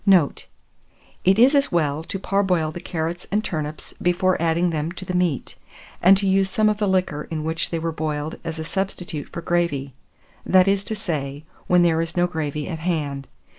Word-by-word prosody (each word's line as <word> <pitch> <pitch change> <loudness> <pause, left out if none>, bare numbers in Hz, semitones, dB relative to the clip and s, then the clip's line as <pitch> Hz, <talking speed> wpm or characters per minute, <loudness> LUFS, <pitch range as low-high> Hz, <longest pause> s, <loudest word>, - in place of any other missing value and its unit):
Note. 185 -8 +3 0.8
It 190 +2 +4
is 250 +5 +6
as 280 -1 +3
well 155 -2 +1
to 195 - -4
parboil 190 -5 +1
the 175 - -7
carrots 170 0 -4
and 210 +2 +1
turnips 155 -5 -5
before 180 +1 +2
adding 170 +1 +2
them 155 +1 -2
to 185 +1 -8
the 185 - -4
meat, 180 -7 0 0.5
and 190 +2 +7
to 200 - -1
use 195 0 +3
some 215 +2 +3
of 210 0 -1
the 210 - +1
liquor 185 -6 0
in 155 -2 -3
which 160 +1 -1
they 165 - -2
were 165 0 -2
boiled 155 -1 -3
as 165 -1 -4
a 160 - -4
substitute 180 -3 -3
for 170 - -7
gravy; 170 -6 0 0.5
that 185 0 +5
is 195 0 +2
to 220 - -3
say, 150 -7 -4 0.2
when 180 -1 +5
there 165 -1 +3
is 165 +1 -4
no 175 - +4
gravy 150 -4 -3
at 165 -3 -4
hand. 150 -5 -2
170 Hz, 200 wpm, -23 LUFS, 155-190 Hz, 0.8 s, and